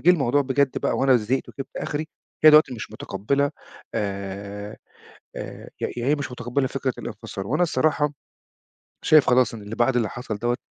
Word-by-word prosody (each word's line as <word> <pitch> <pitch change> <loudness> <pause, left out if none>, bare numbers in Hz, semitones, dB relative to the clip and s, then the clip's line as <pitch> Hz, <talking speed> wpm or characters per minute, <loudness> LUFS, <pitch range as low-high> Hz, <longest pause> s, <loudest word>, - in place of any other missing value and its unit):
جِه 180 - +6
الموضوع 145 -4 +3
بجد 135 0 +1
بقى - - 0
وأنا 135 -1 +5
زهقت 120 +4 -1
وجِبت 135 - -8
آخري، 155 +2 -3 0.4
هي 155 - +11
دلوقتي 150 -4 +6
مش 110 - -7
مُتقبِّلة 130 +8 -1 0.4
آآ 100 +1 -4 0.6
آآ - - -7
ي - - +1
يعني 120 +3 0
هي - - +4
مش 140 -4 -5
مُتقبّلِة 125 +3 -1
فكرة 135 -2 -2
الانفصال 95 - -6
وأنا 175 - +1
الصراحة 150 -1 +1 0.9
شايف 155 -2 +6
خلاص 125 -1 +4
إن 105 - -8
اللي 105 +2 -6
بعد 125 +1 +2
اللي 115 -3 +2
حصل 125 -4 -5
دوّة 120 +2 0
125 Hz, 175 wpm, -24 LUFS, 110-140 Hz, 0.9 s, هي